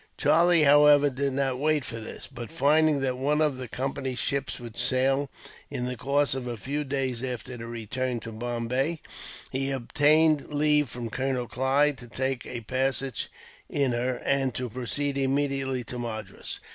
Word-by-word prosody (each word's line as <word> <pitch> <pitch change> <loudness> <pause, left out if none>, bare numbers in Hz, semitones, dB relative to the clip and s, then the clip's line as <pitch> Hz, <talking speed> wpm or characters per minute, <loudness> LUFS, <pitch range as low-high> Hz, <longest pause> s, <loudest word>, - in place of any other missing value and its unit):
Charlie, 170 0 +5
however, 145 0 +6
did 135 +1 -1
not 135 -1 0
wait 150 -2 +1
for 115 - -5
this; 110 - -7
but, 120 -3 -8
finding 155 -1 +3
that 130 -1 -1
one 145 +3 +1
of 150 -4 +2
the 130 -1 -5
Company's 130 +1 -3
ships 140 -2 -2
would 120 -2 -9
sail, 130 +3 +1 0.4
in 125 - -3
the 125 0 -3
course 140 +4 +1
of 130 -2 -4
a 120 -1 -4
few 145 +6 -3
days 130 -3 -2
after 125 0 -4
their 115 -1 -7
return 120 +2 -3
to 115 - -7
Bombay, 120 +7 -2 0.5
he 135 +1 -1
obtained 150 +4 +3
leave 150 -1 +3
from 120 -1 -5
Colonel 130 -1 -1
Clive 135 +4 +2
to 120 0 -11
take 130 +1 -2
a 120 - -5
passage 130 +2 -1 0.4
in 140 -3 +1
her, 125 +2 0
and 135 -3 +1
to 125 -2 -3
proceed 140 +4 -2
immediately 135 -1 0
to 125 +1 -6
Madras. 110 -4 -5
130 Hz, 170 wpm, -27 LUFS, 125-145 Hz, 0.5 s, however